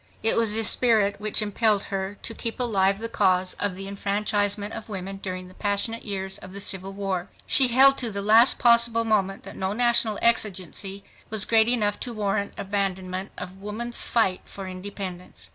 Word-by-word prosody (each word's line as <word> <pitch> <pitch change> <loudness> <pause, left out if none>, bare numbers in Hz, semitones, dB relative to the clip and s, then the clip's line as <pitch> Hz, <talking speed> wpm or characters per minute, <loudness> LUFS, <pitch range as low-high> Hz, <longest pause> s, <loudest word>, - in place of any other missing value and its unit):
It 225 - +4
was 225 -2 +2
this 225 -1 +4
spirit 210 -5 +2
which 215 0 0
impelled 210 0 +1
her 195 0 -4
to 230 - -3
keep 230 +1 -5
alive 195 -5 +2
the 225 +2 -5
cause 185 -4 +1
of 200 -3 -1
the 195 +1 -7
enfranchisement 205 +1 -1
of 220 - -8
women 195 -1 -5
during 185 -1 -6
the 185 - -15
passionate 205 +4 -2
years 195 -2 -4
of 185 - -11
the 200 - -7
Civil 195 0 -3
War. 195 -2 -3 0.2
She 265 - +5
held 270 +3 +5
to 240 - +1
the 200 -1 -4
last 225 +4 +6
possible 235 -1 +4
moment 195 -3 0
that - - -10
no 190 +1 -2
national 235 -2 +2
exigency 195 -3 0 0.3
was 215 -1 +1
great 225 -1 +4
enough 215 -4 +1
to 245 - -5
warrant 200 -1 -1
abandonment 190 -1 -2
of 190 +1 -8
woman's 230 +4 -2
fight 195 -6 +1
for 195 -1 -8
independence. 185 -1 -8
205 Hz, 180 wpm, -25 LUFS, 195-225 Hz, 0.3 s, last